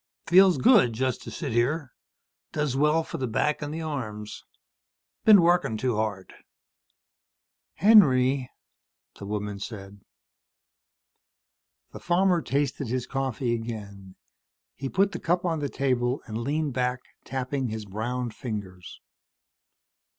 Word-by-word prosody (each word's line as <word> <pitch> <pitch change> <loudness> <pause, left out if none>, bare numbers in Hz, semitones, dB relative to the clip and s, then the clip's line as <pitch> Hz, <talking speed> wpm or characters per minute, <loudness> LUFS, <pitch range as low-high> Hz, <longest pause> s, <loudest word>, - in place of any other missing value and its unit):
"Feels 185 +1 +6
good. 215 - +5
Just 130 +2 -1
to - - -8
sit 145 -6 -5
here. 130 +5 0 0.6
Does 150 -4 -1
well 150 +3 +2
for 165 - -7
the 130 - -1
back 150 +7 0
and 145 0 -4
the 160 +1 -5
arms. 110 -9 -6 0.8
Been 205 -5 +8
working 165 -10 +2
too 120 +1 -1
hard." 105 -3 -3 1.4
"Henry," 135 - +5 0.7
the 100 - -7
woman 105 -1 -4
said. 100 -1 -8 1.9
The - - -9
farmer 180 0 +2
tasted 140 -2 -1
his 125 +1 -2
coffee 130 -3 -2
again. 100 -5 -7 0.6
He 135 - -5
put 195 +5 +2
the - - -5
cup 175 +2 0
on 165 -3 0
the 145 -1 -2
table 125 -1 -1
and 110 0 -5
leaned 145 +3 -1
back, 125 0 -1 0.2
tapping 130 0 -3
his 110 -1 -5
browned 115 +4 -4
fingers. 100 -7 -7
130 Hz, 125 wpm, -26 LUFS, 110-150 Hz, 1.9 s, Been